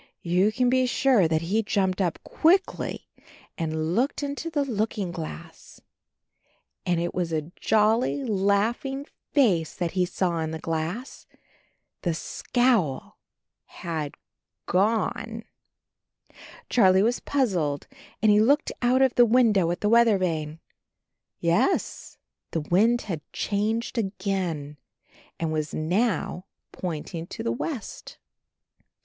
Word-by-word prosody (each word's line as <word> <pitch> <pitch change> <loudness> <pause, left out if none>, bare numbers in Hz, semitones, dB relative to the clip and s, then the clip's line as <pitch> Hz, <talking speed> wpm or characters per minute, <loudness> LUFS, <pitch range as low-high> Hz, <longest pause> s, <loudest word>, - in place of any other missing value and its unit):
You 180 +4 +2
can 250 +2 +1
be 255 +1 +3
sure 245 -7 +3
that 160 0 0
he 205 +7 +1
jumped 195 -3 0
up 175 -3 0
quickly 375 +4 +1 0.5
and 160 0 -2
looked 260 +7 0
into 285 +3 -3
the 295 -3 0
looking 215 -6 -2
glass. 165 -1 -9 1.1
And 175 -2 +2
it 175 +1 -2
was 175 -2 -2
a 155 +1 -3
jolly, 220 +6 +2
laughing 225 +6 0 0.3
face 200 - +2
that 175 -2 -2
he 180 -1 +1
saw 175 -2 -1
in 160 -1 -2
the 160 - -4
glass 165 - -4 0.4
— - - -45
the 170 -3 -1
scowl 225 - 0 0.5
had 160 -5 -5 0.5
gone, 220 +3 0 1.2
Charley 190 -4 +4
was 235 +3 +1
puzzled 180 - 0 0.4
and 215 - +6
he 210 - +5
looked 285 +7 +3
out 255 +2 +4
of 260 -2 +3
the 245 - +6
window 220 -7 +4
at 175 - -3
the 210 - +1
weather 230 -2 +5
vane. 160 -4 -2 0.8
Yes, 170 - 0 0.3
the 165 - -2
wind 220 +10 +3
had 170 -7 -4
changed 220 +4 -1
again 185 -8 -3 0.6
and 160 -1 -1
was 155 -1 -2
now 185 +2 -1 0.2
pointing 165 -1 -5
to - - -7
the 115 - 0
west. 230 - -5
195 Hz, 125 wpm, -26 LUFS, 165-235 Hz, 1.2 s, and